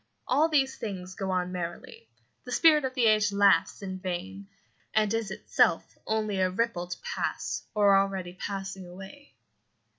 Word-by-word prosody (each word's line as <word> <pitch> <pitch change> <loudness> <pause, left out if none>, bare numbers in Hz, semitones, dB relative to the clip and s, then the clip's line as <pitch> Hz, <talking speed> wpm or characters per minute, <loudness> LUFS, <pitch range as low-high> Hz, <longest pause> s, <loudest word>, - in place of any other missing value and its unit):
All 295 +6 +3
these 270 -4 +1
things 185 -5 -6
go 190 +1 -4
on 180 -1 -1
merrily. 180 - -7 0.3
The - - -9
spirit 305 -4 +5
of 255 -1 -4
the 250 -3 +2
age 215 -1 +4
laughs 200 0 +3
in 190 -1 -5
vain, 190 +2 -5 0.5
and 215 -1 +3
is 225 -3 -1
itself 190 - +1
only 215 -3 -1
a 185 0 +3
ripple 190 -2 -1
to 180 - -5
pass, 485 -1 -3
or 205 -2 +5
already 195 -2 0
passing, 195 -1 -6
away. 195 +11 -12
195 Hz, 155 wpm, -28 LUFS, 185-230 Hz, 0.5 s, spirit